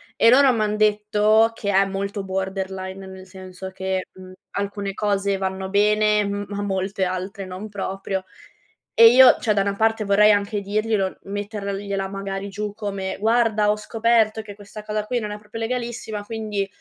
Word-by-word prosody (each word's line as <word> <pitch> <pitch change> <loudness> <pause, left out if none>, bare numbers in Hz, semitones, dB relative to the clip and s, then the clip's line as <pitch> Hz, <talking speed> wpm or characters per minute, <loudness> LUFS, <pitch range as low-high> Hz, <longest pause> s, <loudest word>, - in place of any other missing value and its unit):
E 230 - +5
loro 270 0 +6
m'han 215 -2 0
detto 215 +1 +3
che 205 -2 -4
è 195 0 +4
molto 200 +1 -4
borderline, 190 0 -4
nel 190 0 -11
senso 185 0 -9
che, 190 0 -3
mhmm, 185 0 -13 0.2
alcune 200 0 -3
cose 200 -1 0
vanno 190 0 -3
bene, 210 +1 +3
m 200 0 -3
ma 205 0 -4
molte 195 0 -2
altre 185 +2 -4
non 185 +4 -7
proprio. 195 -1 -4 0.7
E 230 0 +9
io, 255 +1 +7
cioè 215 -3 +1
da 200 - +2
una 200 0 -1
parte 225 +1 +1
vorrei 210 +2 +5
anche 205 0 0
dirglielo, 205 -1 -1
mettergliela 200 -1 -4
magari 195 0 -5
giù 205 +1 -5
come: 200 -3 -4
"Guarda, 220 -1 +2
ho 210 - -1
scoperto 225 0 +1
che 205 -2 -10
questa 205 +1 -11
cosa 210 0 -3
qui 245 +3 -1
non 210 -2 -4
è 210 - -5
proprio 210 +2 -9
legalissima, 225 -3 -4
quindi, 210 -2 -3
205 Hz, 170 wpm, -22 LUFS, 195-215 Hz, 0.7 s, E